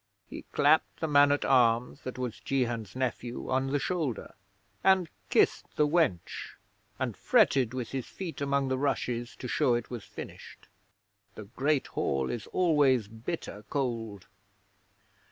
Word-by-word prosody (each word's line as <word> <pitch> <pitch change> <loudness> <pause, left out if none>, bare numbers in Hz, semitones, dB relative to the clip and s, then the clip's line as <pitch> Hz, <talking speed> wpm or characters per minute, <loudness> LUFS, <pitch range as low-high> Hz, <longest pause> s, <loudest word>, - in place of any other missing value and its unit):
He - - -9
clapped 155 +2 +3
the 160 - -1
man 145 -1 +6
at 145 - +1
arms 125 +1 +3
that 130 - -6
was 125 -3 -4
Jehan's 120 -6 -2
nephew 125 -1 -3
on 130 +1 +1
the 140 +2 +1
shoulder, 150 - -2 0.5
and 190 -2 +4 0.2
kissed - - +2
the 150 - +3
wench, 145 - 0 0.4
and - - -2
fretted 130 -3 +3
with 125 -3 -4
his 135 -2 -3
feet 175 -6 -7
among 140 -1 +1
the 130 0 0
rushes 125 -3 -1
to 125 - -7
show 120 0 +2
it 120 0 -4
was 120 -4 -5
finished. - - -10 0.7
(The 110 - -7
Great 135 +7 0
Hall 70 -1 -1
is 115 - -5
always 145 - +3
bitter 110 -1 -6
cold.) 115 -8 -3
130 Hz, 145 wpm, -29 LUFS, 120-145 Hz, 0.7 s, man